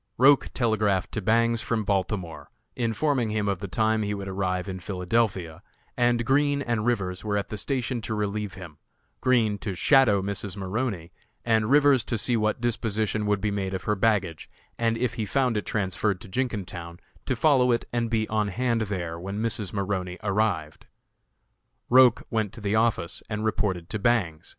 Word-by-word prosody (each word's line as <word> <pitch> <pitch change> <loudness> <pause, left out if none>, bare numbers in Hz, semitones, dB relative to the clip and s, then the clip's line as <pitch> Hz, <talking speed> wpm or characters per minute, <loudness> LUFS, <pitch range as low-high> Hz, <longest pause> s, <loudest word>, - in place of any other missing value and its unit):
Roch 135 +2 +5
telegraphed 110 -6 +1
to 110 - -3
Bangs 115 +2 +2
from 110 -1 -1
Baltimore, 95 -3 -2 0.3
informing 120 +1 0
him 105 -1 -1
of 100 -2 -1
the 100 - -5
time 110 +3 +1
he 105 -1 -1
would 100 -1 -6
arrive 95 -1 -2
in 95 -1 -5
Philadelphia, 90 -2 -1 0.3
and 120 -1 +2
Green 140 +2 +2
and 120 -3 -1
Rivers 95 -6 -1
were 105 -1 -1
at 100 - -3
the - - -4
station 125 -1 -2
to 110 0 -3
relieve 105 -1 -2
him 85 -6 -11 0.4
Green 115 -5 +2
to 100 -3 -4
"shadow" 120 - +4
Mrs. 100 0 -4
Maroney 95 -3 -3 0.3
and 110 -2 +2
Rivers 145 -3 +5
to 120 - -1
see 120 +3 0
what 110 0 0
disposition 110 -2 -1
would 105 -2 +1
be 105 - 0
made 95 -1 -2
of 95 - -5
her 105 - +1
baggage, 100 -6 0 0.3
and 115 -1 0
if 125 +1 -1
he - - -1
found 130 +1 +1
it 105 - -2
transferred 100 -1 -1
to - - -10
Jenkintown 95 -7 -4 0.3
to 130 - +1
follow 125 -1 +4
it 120 - 0
and 120 -1 0
be 110 -1 0
on 105 -1 0
hand 115 +3 0
there 90 -6 -3
when 95 +3 -5
Mrs. 110 -3 -1
Maroney 95 -3 -2
arrived. 95 -7 -1 1.0
Roch 125 -2 +6
went 110 -4 -1
to - - -10
the 100 0 -1
office 110 -6 +1
and 105 0 -3
reported 95 -5 -1
to 105 - -2
Bangs. 100 -9 0
105 Hz, 180 wpm, -26 LUFS, 95-115 Hz, 1.0 s, Roch